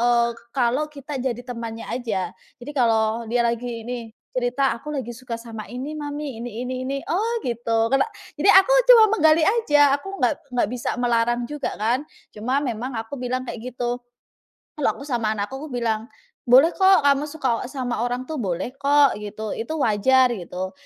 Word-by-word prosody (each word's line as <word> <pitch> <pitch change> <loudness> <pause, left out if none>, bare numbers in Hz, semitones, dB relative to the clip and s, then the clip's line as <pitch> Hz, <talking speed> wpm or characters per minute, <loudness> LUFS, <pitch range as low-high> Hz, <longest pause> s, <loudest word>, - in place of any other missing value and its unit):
eee, 235 0 +3 0.2
kalau 260 +3 +1
kita 285 -1 -7
jadi 245 -2 -2
temannya 230 -2 -6
aja. 220 -7 -2 0.3
Jadi 285 - -7
kalau 225 -2 +2
dia 240 +1 +2
lagi 235 0 -2
ini 240 -1 -5 0.3
cerita, 255 +2 +1
"Aku 300 +6 -8
lagi 260 -5 -4
suka 240 -1 -6
sama 230 -2 -8
ini, 260 +5 -5
mami, 290 -5 -5
ini 240 0 -5
ini 255 0 -3
ini." 275 +1 -2
Oh 450 +7 0
gitu, 230 -1 0
kena 270 - +5 0.3
jadi 370 +7 +5
aku - - 0 0.2
cuma 460 -3 +10
menggali 315 0 +5
aja, 295 -11 +4
aku 390 +7 -8
nggak 310 - +2 0.2
nggak 240 - +2
bisa 245 - -2
melarang 240 0 +1
juga 295 0 -4
kan. 235 +6 +1 0.3
Cuma 250 +6 0
memang 245 +1 -3
aku 225 +4 -5
bilang 255 +1 -2
kayak 235 - -6
gitu. 245 0 -2 0.8
Kalau 295 - +2
aku 280 - -8
sama 230 -5 0
anakku 205 +6 -3
aku 310 - -7
bilang, 225 -2 -1 0.4
"Boleh 265 +7 +7
kok 380 -4 +5
kamu 280 +1 +3
suka 260 -6 -1
sama 255 -4 -3
orang 245 +1 -3
tuh 310 -3 -4
boleh 190 +4 -2
kok," 285 0 +5
gitu, 210 0 -5
"itu 230 +8 -4
wajar" 255 +2 +4
gitu. 185 -2 -5
245 Hz, 175 wpm, -23 LUFS, 230-280 Hz, 0.8 s, cuma